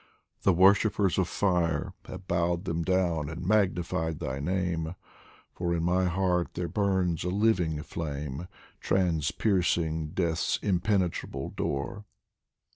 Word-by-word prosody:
the 95 - +4
worshippers 100 +1 +4
of 95 - +2
fire 85 -7 0
Have 90 0 -9
bowed 85 +1 0
them 85 -2 -1
down 85 -4 +1
and 80 +2 -6
magnified 90 -5 +1
my 65 +1 -3
name, 85 0 -1 0.6
For 85 -1 -1
in 85 - -1
my 90 +2 +2
heart 90 -1 0
there 85 0 -2
burns 95 -2 0
a 90 - -1
living 90 -7 +1
flame, 75 0 -5 0.3
Transpiercing 85 -2 +1
Death's 85 -3 +1
impenetrable 95 -1 0
door. 70 +9 -3
90 Hz, 120 wpm, -28 LUFS, 80-95 Hz, 0.6 s, the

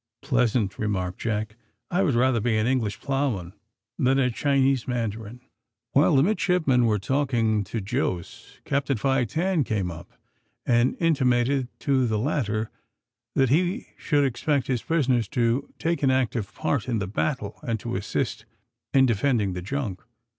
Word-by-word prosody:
"Pleasant," 120 -6 +1
remarked 95 -4 -2
Jack; 110 -1 -2 0.3
"I 180 +2 +2
would 155 -10 +2
rather 125 0 +3
be 110 0 +1
an 110 - +1
English 120 -5 0
ploughman 130 -11 -1 0.5
than 130 +1 +3
a 125 -2 +2
Chinese 135 -1 +1
mandarin." 115 -1 -3 0.5
While 145 +3 +4
the 135 - +5
midshipmen 160 - +2
were 105 -1 +2
talking 115 -2 +1
to 115 - -4
Jos, 100 - -4
Captain 140 -2 0
Fi 135 +2 +1
Tan 170 - 0
came 100 -7 -2
up, 85 +2 -10 0.5
and 120 +1 +2
intimated 130 -4 +2
to 130 -3 +2
the 110 -1 0
latter 110 -4 -1 0.6
that 135 -2 +3
he 180 - +1
should 145 -3 +1
expect 135 +2 0
his 125 -4 -1
prisoners 130 -9 +1
to 120 +4 0
take 165 -2 -1
an 135 - +3
active 125 -5 0
part 140 -5 -1
in 115 - +1
the 100 - -1
battle, 105 +2 -2
and 115 -2 -2
to 120 -1 -4
assist 100 +2 -2 0.5
in 135 -1 +6
defending 115 -4 +1
the 90 - -4
junk. 105 -2 -4
125 Hz, 155 wpm, -25 LUFS, 110-140 Hz, 0.6 s, in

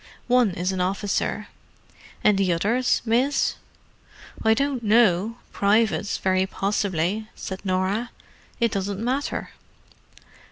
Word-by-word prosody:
"One 250 -3 +4
is 180 +2 -1
an 185 -1 -2
officer." 195 +2 -1 0.8
"And 210 - +5
the 190 -2 +2
others, 230 +9 +1
miss?" 250 +5 +1 0.9
"I 220 0 +4
don't 275 -1 -1
know—privates, 215 0 +2
very 190 0 +1
possibly," 195 +1 -1
said 190 0 -7
Norah. 190 +5 0 0.5
"It 235 -2 +2
doesn't 195 0 -2
matter." 255 +5 -2
205 Hz, 105 wpm, -24 LUFS, 190-235 Hz, 0.9 s, And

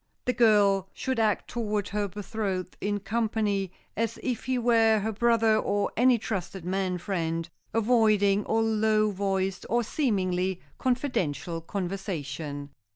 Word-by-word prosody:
The 250 - +1
girl 205 -5 +4
should 260 -3 -2
act 215 -2 +1
toward 210 -4 -2
her 205 0 -1
betrothed 200 -1 -4
in 205 0 -1
company 210 -2 0 0.2
as 230 +1 -1
if 250 -4 -2
he 255 0 0
were 230 -2 +4
her 215 +2 -1
brother 225 0 +3
or 205 -1 0
any 250 +1 +5
trusted 190 -4 -4
man 185 0 -1
friend, 165 -2 -2 0.2
avoiding 215 -3 +3
all 225 0 +1
low 215 -1 +2
voiced 195 -1 -1
or 240 +1 +2
seemingly 190 - 0 0.2
confidential 190 - -1
conversation. 160 -6 -4
205 Hz, 130 wpm, -27 LUFS, 190-225 Hz, 0.2 s, any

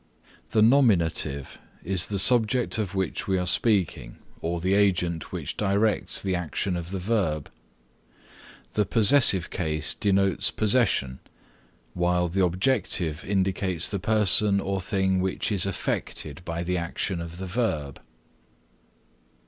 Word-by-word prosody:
The 110 - +2
nominative 90 - +1 0.2
is 95 -1 0
the 100 - -3
subject 120 +3 +3
of 100 -3 -4
which 95 -1 -3
we 95 -1 0
are 90 - -2
speaking 90 - 0 0.2
or 85 +1 -3
the 95 +3 -1
agent 90 -6 0
which - - -5
directs 105 +1 0
the 95 -1 -2
action 90 +2 -3
of 85 -1 -6
the 95 - -5
verb; 90 -7 -2 1.2
the 105 - 0
possessive 105 -3 +5
case 75 -4 -1
denotes 100 -1 +1
possession, 105 - 0 0.7
while 90 0 0
the 95 +3 0
objective 90 - -1
indicates 95 -3 -1
the 100 - -3
person 105 0 +5
or 100 -1 -3
thing 95 -1 -1
which 95 +4 -2
is 100 -2 +2
affected 80 -4 -4
by 85 0 -5
the 90 +1 -2
action 85 +1 -4
of 85 0 -8
the 95 - -6
verb. 85 - -3
95 Hz, 130 wpm, -25 LUFS, 85-105 Hz, 1.2 s, possessive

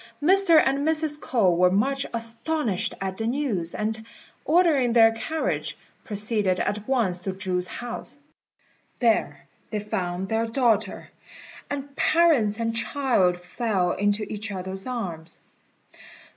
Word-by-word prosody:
Mr. 350 +1 +5
and 275 -1 +2
Mrs. 310 0 0
K'ou 205 - +2
were 180 +1 +4
much 270 +9 +1
astonished 230 - -1
at 190 0 -4
the 225 - -1
news, 230 - -2
and, 220 +1 -3 0.4
ordering 305 -8 +3
their 225 -1 +7
carriage, 315 +8 -2 0.3
proceeded 205 -3 -1
at 210 +1 -2
once 220 -10 0
to 190 +1 -3
Chu's 180 -1 -2
house. 240 +4 -6 0.8
There 145 - +1 0.2
they 215 - -3
found 190 -3 -3
their 225 +2 0
daughter, 225 -4 0 0.6
and 280 0 -5
parents 280 -13 +3
and 230 0 -1
child 225 -8 +1
fell 185 -1 -1
into 205 +2 0
each 210 +1 -5
other's 190 +2 -5
arms. 180 -10 -5
225 Hz, 125 wpm, -25 LUFS, 190-270 Hz, 0.8 s, their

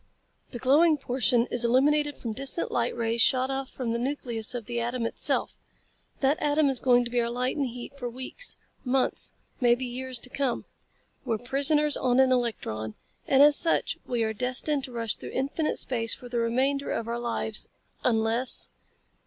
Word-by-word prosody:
The 245 - -6
glowing 300 +6 +4
portion 245 -3 +1
is 245 - +2
illuminated 290 +4 +3
from 230 -3 -4
distant 275 +7 -2
light 240 0 0
rays 230 0 +1
shot 260 +2 +3
off 270 0 -3
from 240 -3 -3
the 235 - -1
nucleus 245 -3 -3
of 235 -3 -4
the 240 +1 -3
atom 235 0 -2
itself. - - -1 0.6
That 275 +2 +2
atom 295 0 +3
is 265 -2 -1
going 245 -1 +4
to 240 - -6
be 245 -1 +2
our 235 - -1
light 250 +2 -1
and 280 -3 0
heat 245 +2 -8
for 245 -2 -3
weeks, 260 - -5 0.3
months, 255 0 0 0.3
perhaps 240 -1 +3
years 255 +1 -4
to 250 +2 -6
come. 270 -4 -1 0.6
We're 225 - -1
prisoners 285 +5 +1
on 250 0 +2
an 265 -1 +5
electron, 110 - -1 0.3
and 275 +1 +6
as 295 0 +7
such 330 - 0
we 240 -2 0
are 220 0 -1
destined 255 +5 0
to 255 - -11
rush 230 -2 -2
through - - -8
infinite 280 +4 -1
space 230 -3 +1
for 250 - -11
the 240 -1 -2
remainder 265 +5 0
of 230 - -2
our 235 +1 -2
lives 230 -2 -2 0.4
unless...." 230 +1 +2
250 Hz, 180 wpm, -27 LUFS, 235-270 Hz, 0.6 s, as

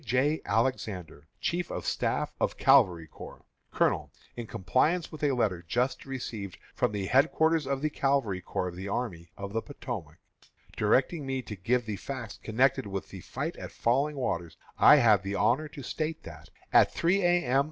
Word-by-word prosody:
J. 135 +6 +1
Alexander, 100 - -1
Chief 175 0 -1
of - - -5
Staff - - -1
of - - 0
Cavalry 95 -12 +4
Corps_: - - -11 0.3
COLONEL: - - +1 0.2
In 120 -2 -6
compliance 130 - +1
with 155 - -9
a 145 -2 +3
letter 105 -8 0
just 125 +9 -1
received 110 - -5 0.2
from - - 0
the 100 -2 -3
headquarters 155 +6 +3
of 140 0 -2
the 155 - +1
Cavalry 135 -11 0
Corps 90 0 -3
of 85 - -10
the 95 +2 -6
Army 95 -6 -3
of 100 0 -6
the 115 - 0
Potomac, 110 - -7 0.6
directing 130 +9 +2
me 130 -1 -2
to 105 - -7
give 120 +6 0
the 105 -2 -4
facts 115 -2 -6
connected 130 +2 +1
with 95 -1 -5
the 95 - -9
fight - - -4
at - - -7
Falling 140 +6 +1
Waters, 85 - -3 0.2
I - - +9
have 110 -8 +5
the 100 0 -4
honor 140 +10 +2
to 145 -2 -10
state 155 +5 -3
that, 80 -1 -11 0.2
at - - +6
three 185 +4 +2
A. 175 -2 +3
M. 130 +2 +3
120 Hz, 180 wpm, -29 LUFS, 100-140 Hz, 0.6 s, I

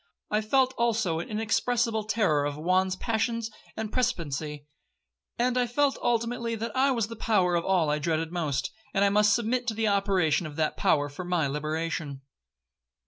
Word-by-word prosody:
I 210 +1 +2
felt 260 +4 +2
also 220 -8 +1
an 170 - -6
inexpressible 225 +1 0
terror 200 -9 +2
of 145 0 -2
Juan's 185 +4 +1
passions 225 +1 -1 0.3
and 220 -1 -4
precipitancy; 150 - -2 0.7
and 250 +1 +1
I 245 - +1
felt 275 +3 +1
ultimately 235 0 0
that 225 0 -5
I 270 +2 +3
was 235 -5 +1
in - - -14
the 230 - -6
power 200 -5 +2
of 170 -1 0
all 175 -6 +2
I 150 - 0
dreaded 160 +1 -1
most, 150 -6 -1 0.2
and 200 0 +3
must 210 +1 +5
submit 240 +2 -1
to 220 - -1
the 220 0 0
operation 195 -5 +2
of 150 - -10
that 155 -1 0
power 145 -1 +2
for 145 +6 -7
my 175 -3 0
liberation. 150 -1 -3
200 Hz, 175 wpm, -27 LUFS, 160-230 Hz, 0.7 s, must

